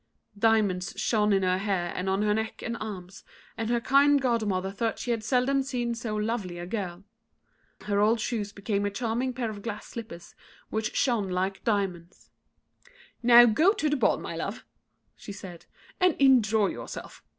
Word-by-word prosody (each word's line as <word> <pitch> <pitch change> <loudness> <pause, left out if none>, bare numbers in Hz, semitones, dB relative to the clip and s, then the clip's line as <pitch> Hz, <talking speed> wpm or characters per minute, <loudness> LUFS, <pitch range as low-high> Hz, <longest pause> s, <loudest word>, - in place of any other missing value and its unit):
Diamonds 200 -4 +1
shone 210 -2 +2
in 195 -1 +2
her 185 0 +1
hair 190 -4 -1
and 185 +1 -2
on 195 +2 +1
her 210 0 +2
neck 220 +1 -3
and 235 - -3
arms, 190 -3 -7 0.3
and 225 0 -3
her 240 0 +2
kind 280 +4 +4
godmother 215 -7 0
thought 225 +3 -2
she 245 - -3
had 230 -2 -1
seldom 255 +4 +2
seen 245 -3 -2
so 230 -2 -4
lovely 210 -4 -2
a 175 - -6
girl. 185 -2 -5 0.8
Her 205 -1 -1
old 220 +3 +3
shoes 215 -3 -2
became 200 0 -2
a 205 - 0
charming 235 +4 -2
pair 240 -3 -3
of 205 -1 -9
glass 210 -1 -5
slippers, 195 -8 -9 0.4
which 220 0 -2
shone 230 -7 +1
like 190 +1 -2
diamonds. 190 -5 -3 0.9
"Now 240 0 +8
go 310 - +4
to 310 -8 -1
the - - +2
ball, 265 - +2
my - - -6
love," - - -5 0.5
she - - -10
said, 185 -4 -10 0.3
"and 365 -3 +3
enjoy 225 -6 +4
yourself. - - -8
215 Hz, 175 wpm, -27 LUFS, 195-235 Hz, 0.9 s, Now